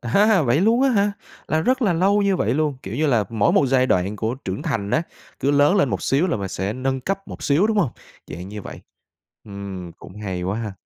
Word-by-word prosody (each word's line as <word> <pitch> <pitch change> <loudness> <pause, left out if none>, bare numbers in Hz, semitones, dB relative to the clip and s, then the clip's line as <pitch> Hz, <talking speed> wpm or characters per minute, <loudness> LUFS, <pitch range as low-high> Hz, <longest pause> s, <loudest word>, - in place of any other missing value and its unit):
À 120 - -6
ha, 205 - +4
vậy 130 +5 +2
luôn 230 +6 +3
á 270 - +4
hả? 205 -2 +2 0.4
Là 155 - +1
rất 255 +7 +1
là 195 -5 +3
lâu 200 +4 +2
như 195 -2 +2
vậy 115 - 0
luôn, 150 -3 0
kiểu 95 +4 -6
như 155 +1 +1
là, 115 -7 +2
mỗi 110 -3 +1
một 140 - +4
giai 130 0 +3
đoạn 95 +1 0
của 110 +4 -2
trưởng 100 -2 -6
thành 115 - -2
á, 160 - +2 0.4
cứ 140 - +2
lớn 145 +6 +4
lên 165 -9 +3
một - - -3
xíu 145 +7 +2
là - - 0
mình 100 -2 -4
sẽ 95 +3 -3
nâng 130 +2 -2
cấp 195 +8 -4
một - - -9
xíu, 155 +9 +3
đúng 220 -1 0
hông? 135 - +2 0.4
Dạng 90 +5 -8
như 105 -1 -7
vậy, - - -9 0.6
ừm, 100 -4 -7
cũng 95 - -14
hay 95 -3 -4
quá 95 +5 -2
ha. 110 -4 -4
135 Hz, 255 wpm, -22 LUFS, -, 0.6 s, ha